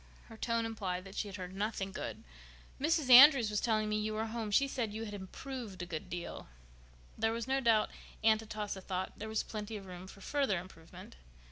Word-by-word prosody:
Her 225 - -10
tone 230 0 0
implied 190 -5 -3
that 195 0 -11
she 210 - -2
had 195 - -7
heard 180 -1 -7
nothing 195 -1 -2
good. - - -6 0.6
"Mrs. 305 -3 +2
Andrews 250 -3 +10
was 210 - 0
telling 215 -2 +1
me 210 0 0
you 215 0 -2
were 220 +1 -1
home. 225 -1 -4
She 275 +7 +4
said 240 -5 -2
you 220 +2 -4
had 205 - -7
improved 205 0 -7
a - - -4
good 165 -3 -6
deal." 175 0 -6 0.7
There 225 +1 +2
was 230 +1 -3
no 270 +1 +2
doubt 225 -3 +3 0.3
Aunt 220 0 +5
Atossa 210 -3 -5
thought 185 0 -3
there 220 +1 -5
was 220 - 0
plenty 215 0 -5
of 195 - -10
room 180 0 -9
for 195 - -13
further 275 -5 +1
improvement. 165 - -11
215 Hz, 210 wpm, -33 LUFS, 195-230 Hz, 0.7 s, Andrews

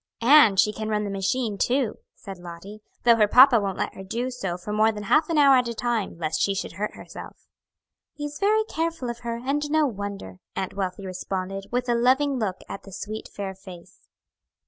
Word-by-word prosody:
"And 235 -7 +7
she 210 - +4
can 215 0 -4
run 210 -1 0
the 200 - -3
machine 200 +2 -1
too," 250 -3 0 0.2
said 195 -3 -10
Lottie, 175 +5 -10 0.2
"though 235 -1 +6
her 210 -2 +4
papa 250 +2 +7
won't 195 -2 -3
let - - -2
her 190 - -9
do 235 +6 -3
so 195 -8 -4
for 190 +4 -6
more 215 +1 +4
than 210 -1 -7
half 305 +10 +3
an 330 - 0
hour 280 -2 +7
at 250 -1 +1
a 235 - -4
time, 230 -6 -2
lest 160 -2 -2
she 200 - +1
should - - -4
hurt 205 +4 -4
herself." - - -11 0.7
"He's 295 0 -6
very 430 +2 +3
careful 325 - -3
of 235 - -10
her, 235 -1 -4
and 290 +2 -1
no 310 0 +3
wonder," 200 - -6 0.2
Aunt 190 - -3
Wealthy 195 0 -4
responded, 190 +1 -4
with 245 +1 -1
a 240 - +2
loving 260 +3 +2
look 190 -4 -2
at - - -7
the 195 - -13
sweet, 215 +3 -6
fair 195 -1 -5
face. 185 -2 -14
215 Hz, 210 wpm, -25 LUFS, 195-255 Hz, 0.7 s, And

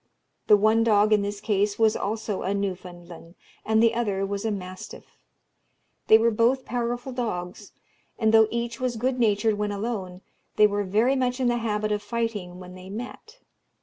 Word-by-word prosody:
The 210 - +7
one 220 +2 +3
dog 215 -1 +3
in 210 - +3
this 200 0 -4
case 205 -1 0
was 220 -1 +3
also 215 -1 -3
a 195 +2 -1
Newfoundland, 175 -3 -6 0.3
and 220 +1 +2
the 230 0 +4
other 205 -5 -1
was 200 +2 -4
a - - +1
mastiff. 185 -3 -8 0.9
They 220 - +8
were 230 +1 +2
both 240 +4 +1
powerful 245 +1 -3
dogs; 205 -5 -5 0.5
and 220 -1 +1
though 220 -1 +6
each 235 0 -4
was 255 -2 -2
good 250 +3 -1
natured 215 -1 +1
when 210 0 -1
alone, 200 -4 -4 0.3
they 215 - +6
were 205 0 0
very 220 +8 +2
much 250 -1 -1
in 250 -2 +2
the 240 - +1
habit 215 -2 -2
of 210 0 -1
fighting 210 -5 -4
when 180 0 -11
they 185 0 -11
met. 250 - -9
215 Hz, 180 wpm, -25 LUFS, 200-235 Hz, 0.9 s, They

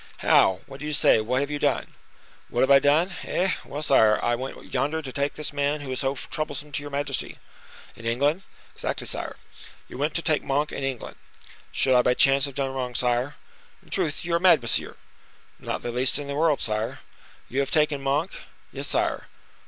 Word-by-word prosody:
"How! 95 -1 +5
What 135 - -11
do 150 - -5
you 150 - -2
say? 110 - +4
What 125 +5 0
have 140 +1 -2
you 145 - -2
done?" 145 -2 0 0.6
"What 120 - 0
have 130 - +3
I 135 - +9
done? 155 +7 +3
Eh! 185 +1 0
well, 150 +2 -5
sire, 110 -7 +5
I 120 - +2
went 130 +3 -6
yonder 155 +3 0
to 140 -5 -6
take 140 +2 -1
this 150 -1 -5
man 145 +1 0
who 135 -2 -6
is 130 - -2
so 135 0 0
troublesome 150 +1 -5
to 145 - -2
your 145 - -7
majesty." 140 -1 -3 0.6
"In 115 - -13
England?" 140 +9 +1 0.3
"Exactly, - - -4
sire." - - -4 0.5
"You 125 - -9
went 150 +2 -1
to 170 - +1
take 155 -3 +2
Monk 145 +2 0
in 140 - -5
England?" 135 -3 -4 0.5
"Should 130 - +2
I 125 - +6
by 125 0 +2
chance 135 +2 +4
have 140 -2 -6
done 135 -1 -1
wrong, 125 -2 -4
sire?" 125 +3 0 0.5
"In - - -21
truth, 150 +2 -1
you 175 - -2
are 170 - +3
mad, 175 -3 +6
monsieur!" 115 - -1 0.6
"Not - - -4
the 120 - -3
least 125 +2 +3
in 145 - -3
the 140 - -4
world, 150 0 +2
sire." 110 +1 -2 0.5
"You 130 - -2
have 140 -1 0
taken 150 -2 +2
Monk?" 145 +6 0 0.4
"Yes, - - -4
sire." - - 0
140 Hz, 205 wpm, -25 LUFS, 130-150 Hz, 0.6 s, I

